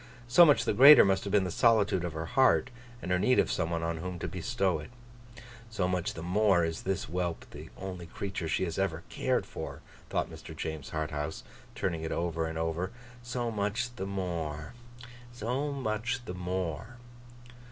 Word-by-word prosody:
So 130 +8 +8
much 115 -6 +4
the - - +1
greater 140 +5 +10
must 95 0 +1
have 100 - -3
been 100 -1 +4
the 90 - -3
solitude 105 -4 +3
of 85 -2 -3
her 80 +1 -4
heart, 130 +5 +3 0.3
and 90 - -3
her 90 - +3
need 125 +7 +3
of - - +3
some 80 - -1
one 85 -1 -2
on 85 0 -1
whom 90 +2 -5
to - - -4
bestow 95 -1 -1
it. 75 - -9 0.8
'So 100 -5 -1
much 90 -2 -1
the 80 - -6
more 95 -1 +3
is 80 0 -3
this 95 -1 -1
whelp 85 0 -3
the - - -10
only 90 -3 -6
creature 95 -1 -4
she 80 - 0
has 85 0 -3
ever 85 -4 -1
cared - - 0
for,' - - -7 0.3
thought - - 0
Mr. - - -10
James 80 -3 -5
Harthouse, 75 0 -3 0.3
turning 85 -4 -2
it 80 - -4
over 85 -1 -1
and 80 0 -5
over. 80 +3 -1 0.3
'So 120 -1 -3
much 110 +4 -2
the 95 -5 -4
more. 85 -5 -4 0.6
So 125 +5 -2
much 125 -1 -2
the 90 - -5
more. 90 - -4
90 Hz, 185 wpm, -30 LUFS, 80-110 Hz, 0.8 s, greater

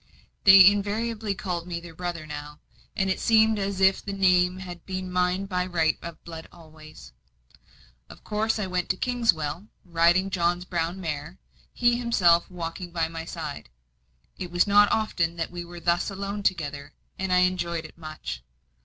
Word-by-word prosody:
They 195 -1 +10
invariably 205 +1 +1
called 175 -3 -4
me 170 -1 -4
their 170 -1 -11
brother 175 -1 -5
now; 150 0 -8 0.4
and 195 -2 0
it 190 - 0
seemed 220 -1 +4
as 195 -1 -2
if 190 0 +4
the 200 - -5
name 185 -2 +3
had 180 -3 -9
been 185 -1 -5
mine 180 +1 +1
by 180 -2 -1
right 165 -3 +1
of 170 -1 -9
blood 165 -1 -9
always. 155 - -14 1.0
Of - - -14
course, 220 +1 0
I 210 - -2
went 180 -1 -2
to 185 - 0
Kingswell, 205 - 0 0.2
riding 175 +3 +3
John's 175 0 0
brown 170 0 -2
mare, 160 0 -5 0.3
he 240 0 +2
himself 180 -8 +3
walking 175 0 -6
by 165 -2 -1
my 165 0 -6
side. 155 - -7 0.7
It 180 - -5
was 175 +1 +2
not 205 0 +5
often 170 -6 0
that 165 0 -3
we 175 0 -6
were 175 0 -10
thus 170 +3 +1
alone 200 +1 -4
together, 145 -7 -2 0.3
and 190 -1 -2
I 180 0 +5
enjoyed 175 -3 0
it 160 - -12
much. 155 - -7
180 Hz, 170 wpm, -26 LUFS, 165-195 Hz, 1.0 s, They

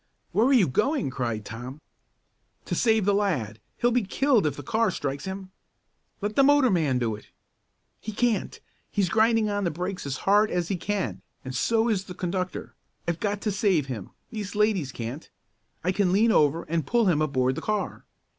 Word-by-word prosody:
"Where 225 +4 +3
are - - +3
you 235 -10 +5
going?" 265 - 0
cried 115 -5 -3
Tom. 125 +6 -7 0.9
"To - - -3
save 220 -4 +3
that 205 - +3
lad! 145 - 0 0.2
He'll 240 - +2
be 245 +1 +3
killed 235 - +2
if 145 - -2
the - - -8
car 230 -2 +1
strikes 140 -3 -3
him!" 190 0 -6 0.7
"Let 210 +1 -2
the - - +5
motorman 245 - +4
do 115 -3 0
it!" 105 - -14 0.7
"He 215 - -6
can't! 230 0 0 0.3
He's 200 -4 0
grinding 225 +1 +3
on 205 -1 -1
the 175 - +1
brakes 180 +1 -4
as 135 -1 -2
hard 210 +2 +5
as 175 -2 -1
he 195 - 0
can 200 +2 -3 0.2
and 130 - -5
so 225 0 +2
is 200 -4 0
the 180 - -9
conductor. 180 0 -3 0.3
I've 170 -1 -1
got 205 -1 -1
to 210 - 0
save 190 -7 +2
him 120 -8 -6 0.2
these 210 -2 -5
ladies 205 -10 +1
can't! 120 +7 -6 0.5
I 180 - +2
can 190 -1 +1
lean 220 +4 +4
over 155 -2 +3
and 165 -2 -2
pull 235 -1 +3
him 165 -6 +3
aboard 130 -4 +1
the - - -5
car." 210 -1 -2
190 Hz, 190 wpm, -26 LUFS, 150-215 Hz, 0.9 s, you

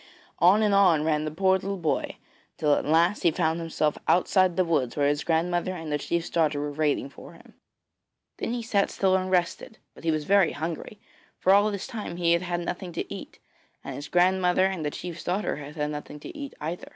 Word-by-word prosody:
On 190 +6 +5
and 210 -1 +2
on 180 -6 +4
ran 155 -1 +1
the - - -1
poor 190 +3 +2
little 195 +1 -4
boy, 165 -4 -1 0.4
till 150 -2 +2
at - - 0
last 170 +6 +3
he 170 - +4
found 160 0 0
himself 155 -2 -1
outside 185 0 +3
the 185 - +3
woods 145 -8 0
where 145 -1 +3
his 145 +1 0
grandmother 175 +2 0
and 160 -3 -6
the 150 - 0
chief's 170 +3 -2
daughter 155 -3 +1
were 145 0 -3
waiting 145 -2 0
for 140 - -13
him. - - -18 0.8
Then - - -3
he 240 -1 -3
sat 205 -3 +1
still 190 -1 +1
and 185 0 -1
rested; 180 +4 -1 0.2
but - - -15
he 165 - 0
was 155 -1 0
very 195 +1 +3
hungry, 165 +6 -5 0.4
for 190 - +4
all 205 +2 +5
this 200 -2 -4
time 210 -6 -6
he 170 -1 +2
had 170 - +2
had 175 -1 -2
nothing 175 +1 -5
to - - -4
eat, - - -9 0.5
and - - -6
the 145 - -9
grandmother 180 +1 +3
and 190 -4 -2
the 150 - 0
chief's 170 +2 -7
daughter 185 0 -1
had 145 +1 -9
had 150 -1 -2
nothing 150 0 -7
to - - -9
eat 285 -2 -7
either. 165 +4 -5
170 Hz, 220 wpm, -26 LUFS, 155-190 Hz, 0.8 s, On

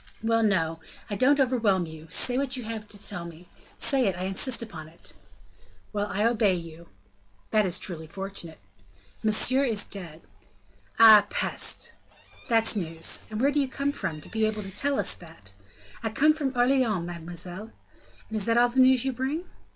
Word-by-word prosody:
"Well, 225 0 +2
no, 165 -7 +1 0.3
I - - -1
don't 280 +7 +3
overwhelm 230 -9 +2
you; 160 0 -11
say 245 - +4
what 270 0 0
you 250 - -5
have 220 -1 -6
to 210 - -7
tell 200 -3 -2
me 170 +1 -11 0.3
say 265 -5 +3
it, 190 - 0
I 180 - -5
insist 210 +6 +2
upon 165 -8 -9
it." 165 +2 -14 0.8
"Well, 205 0 -1
I 205 +2 -1
obey 220 -5 +3
you." 170 -1 -9 0.6
"That 215 -2 +3
is 175 - -3
truly 160 -5 -3
fortunate." 190 -2 -6 0.7
"Monsieur 235 +5 +3
is 220 -6 0
dead." 170 -5 -6 0.7
"Ah, 215 -2 +8
peste! - - -2 0.6
that's 225 -1 +2
news! 165 -4 -2
And 215 0 -5
where 275 +4 +3
do 290 - +1
you 275 - +1
come 280 +2 -2
from, 155 - -5
to - - -12
be 220 0 -2
able 215 -1 -3
to 195 0 -9
tell 280 +5 0
us - - +2
that?" 160 - -14 0.5
"I 225 - -2
come 300 +8 +3
from 275 -4 -3
Orleans, 245 -7 +2
mademoiselle." 175 +4 -7 0.6
"And 220 - -7
is 210 -2 0
that 230 0 +2
all 240 0 +5
the 255 +2 -1
news 260 -1 +5
you 265 - 0
bring?" 270 +8 -3
215 Hz, 180 wpm, -26 LUFS, 175-250 Hz, 0.8 s, Ah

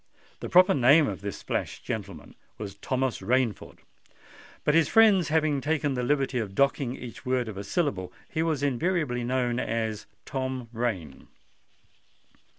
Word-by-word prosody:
The - - -6
proper 180 0 +6
name 145 +3 +5
of 100 -2 -5
this 100 -1 -6
flash - - -3
gentleman 100 -3 -6 0.2
was 100 -2 -6
Thomas 130 +5 -2
Rainford; 125 -4 -1 0.8
but 150 - +2
his 165 -1 +4
friends 210 -7 +5
had 160 +1 +2 0.2
taken 145 -1 0
the 125 - -2
liberty 135 0 0
of 100 -4 -5
docking 135 -2 +1
each 120 -2 -9
word 130 -2 0
of 110 - -6
a 100 - -5
syllable; 100 - -1
and - - -26
he 160 - 0
was 160 -4 0
invariably 145 -2 0
known 125 0 0
as 110 -2 -2 0.2
Tom 130 -3 -4
Rain. 105 - -3
130 Hz, 155 wpm, -27 LUFS, 110-145 Hz, 0.8 s, proper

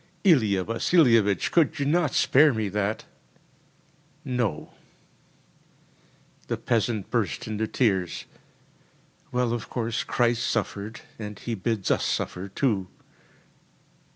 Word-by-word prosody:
“Ilia 110 - +4
Vasilievich, 115 - +3
could 160 -1 +3
you 140 - -1
not 155 0 +1
spare 145 -1 +5
me 110 -2 -1
that?‚ÄĚ 130 - -8
‚ÄúNo.‚ÄĚ 110 -11 -1 1.8
The - - -2
peasant 115 -3 -1
burst 115 -8 -1
into 110 0 -2
tears. 95 -8 0 1.1
“Well, 125 -1 0
of 120 - -5
course, 115 -1 -2
Christ 120 -1 +1
suffered, 105 -1 -3 0.2
and 105 -2 -6
He 120 - -5
bids 110 -1 -1
us - - +2
suffer 90 +2 -2
too. 100 -4 0
115 Hz, 105 wpm, -26 LUFS, 105-130 Hz, 1.8 s, spare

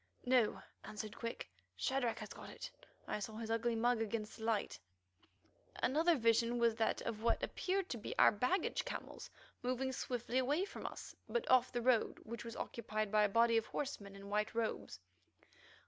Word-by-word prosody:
"No," 245 -3 +3 0.2
answered 215 +1 -6
Quick; 230 0 -5 0.3
"Shadrach 260 -3 0
has - - -6
got - - -10
it. - - -7 0.4
I - - -1
saw 215 +2 -5
his 225 0 -4
ugly 230 +1 +1
mug 235 0 +2
against 220 -1 -2
the 220 - -9
light." 225 -2 0 1.0
Another 320 +6 +3
vision 230 -1 +3
was 235 -1 +4
that 225 - +1
of 220 -2 -3
what 230 0 +2
appeared 385 0 -1
to 235 - -3
be - - -5
our - - +8
baggage 250 - +1
camels - - -6 0.3
moving 255 +1 0
swiftly 245 0 -1
away 290 +9 +2
from - - -6
us, - - -8
but 475 - -1
off 255 -1 +5
the 240 -1 -2
road 245 -2 +3
which 235 +1 -6
was 230 0 -7
occupied 215 -2 -3
by 210 -1 +5
a - - +1
body 230 +2 +4
of 225 - 0
horsemen 205 -9 -4
in 195 0 -10
white 210 +2 0
robes. 220 - -2
230 Hz, 180 wpm, -37 LUFS, 220-255 Hz, 1.0 s, our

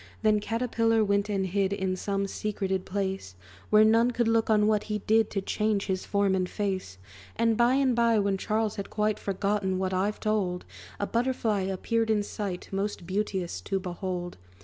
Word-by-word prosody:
Then 215 -1 +4
Caterpillar 225 0 +1
went 200 +1 +1
and 195 -2 0
hid 190 +1 0
In 190 -2 -1
some 195 +1 -1
secreted 195 -2 -2
place, 190 - -3 0.3
Where 215 0 +6
none 225 +2 +4
could 240 -1 0
look 225 0 +2
on 210 -1 +4
what 210 -1 +2
he 210 -1 -2
did 220 +1 +3
To 195 - -2
change 210 0 0
his 190 -1 -2
form 200 -1 +2
and 185 -1 0
face. 190 - -3 0.4
And 230 -1 +2
by 240 +3 +4
and 265 -3 +2
by, 235 -1 +3
when 200 -2 +1
Charles 215 +1 -1
had 200 - -5
quite 215 0 0
Forgotten 195 -1 -1
what 190 0 -1
I've 200 +3 0
told, 195 -4 -1 0.3
A 205 - 0
Butterfly 235 -2 0
appeared 220 +4 -1
in 210 -2 +2
sight, 200 -3 -5
Most 195 -2 -3
beauteous 190 -1 -2
to 195 - -2
behold. 180 -1 -4
205 Hz, 180 wpm, -28 LUFS, 190-220 Hz, 0.4 s, Where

